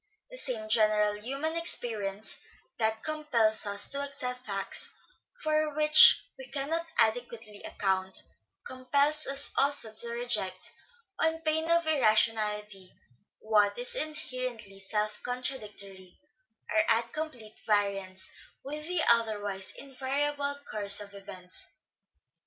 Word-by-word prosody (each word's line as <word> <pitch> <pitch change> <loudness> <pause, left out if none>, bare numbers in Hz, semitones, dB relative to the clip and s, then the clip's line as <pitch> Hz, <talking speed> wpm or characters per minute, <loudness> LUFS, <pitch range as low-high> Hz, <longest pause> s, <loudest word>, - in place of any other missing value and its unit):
The - - -7
same 230 - -2
general 215 -1 +3
human 275 +10 -4
experience 220 -11 -1 0.4
that 220 0 0
compels 245 -9 +1
us 200 0 0
to 280 - -3
accept 250 -3 -5
facts 195 -1 -2 0.5
for 310 -1 0
which 305 0 +9 0.2
we - - -9
cannot 320 +4 -2
adequately 225 -2 0
account, 190 -1 -2 0.5
compels 280 +4 0
us 275 +1 -1
also 275 -6 +2
to 235 +2 +2
reject, 215 -6 -2 0.5
on 320 0 +1
pain 320 +1 -1
of 335 0 +3
irrationality, 215 -7 +1 0.5
what 210 -2 +2
is 245 +1 -3
inherently 255 -9 -3
self 210 +2 -2
contradictory, 210 -7 -6 0.5
or 215 - +4
at 230 +1 +1
complete 255 -9 -6
variance 195 -3 -1 0.4
with 300 +3 -6
tne 360 -2 +1
otherwise 205 -4 +1
invariable 280 +1 -2
course 205 -1 +1
of 200 -1 -7
events. 185 -2 -7
230 Hz, 110 wpm, -29 LUFS, 210-285 Hz, 0.5 s, which